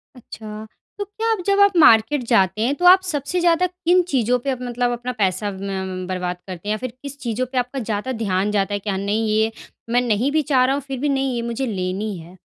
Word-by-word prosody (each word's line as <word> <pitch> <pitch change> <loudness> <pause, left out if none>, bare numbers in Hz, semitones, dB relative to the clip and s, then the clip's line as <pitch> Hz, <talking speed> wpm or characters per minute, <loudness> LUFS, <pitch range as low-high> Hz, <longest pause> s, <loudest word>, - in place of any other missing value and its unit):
अच्छा, 215 -3 -9 0.3
तो 410 - -2
क्या 440 +3 -4
आप 440 - +1
जब 400 0 +2
आप 405 -1 +5
मार्केट 250 -2 +5
जाते 195 -3 +2
हैं, 250 +5 +2
तो 355 - -2
आप 370 +1 +8
सबसे 315 -1 -2
ज़्यादा 345 +1 +3
किन 360 0 +2
चीज़ों 250 -1 +2
पे, 275 +3 -4
अप 255 - -4
मतलब 245 0 -1
अपना 245 +1 -3
पैसा 195 +2 0
म 190 -1 -5
बर्बाद 180 -1 -3
करते 185 +1 -8
हैं? - - 0
या - - -2
फिर 250 0 -6
किस 280 0 -8
चीज़ों 240 0 -2
पे 260 - -4
आपका 250 +2 -1
ज़्यादा 225 +2 -3
ध्यान 195 0 0
जाता 205 -1 0
है? 205 - -1
क्या 200 -1 -3
नहीं 205 +3 -1
ये, 220 +1 +2 0.4
मैं 245 +1 +3
नहीं 245 +3 +1
भी 310 - +2
चाह 255 -2 +5
रहा 265 - +2
हूँ 285 - -3
फिर 265 -2 -4
भी 290 - 0
नहीं 270 -2 0
ये 235 - -2
मुझे 265 +3 -2
लेनी 195 -1 -3
है? 170 +3 -13
240 Hz, 240 wpm, -21 LUFS, 205-275 Hz, 0.4 s, आप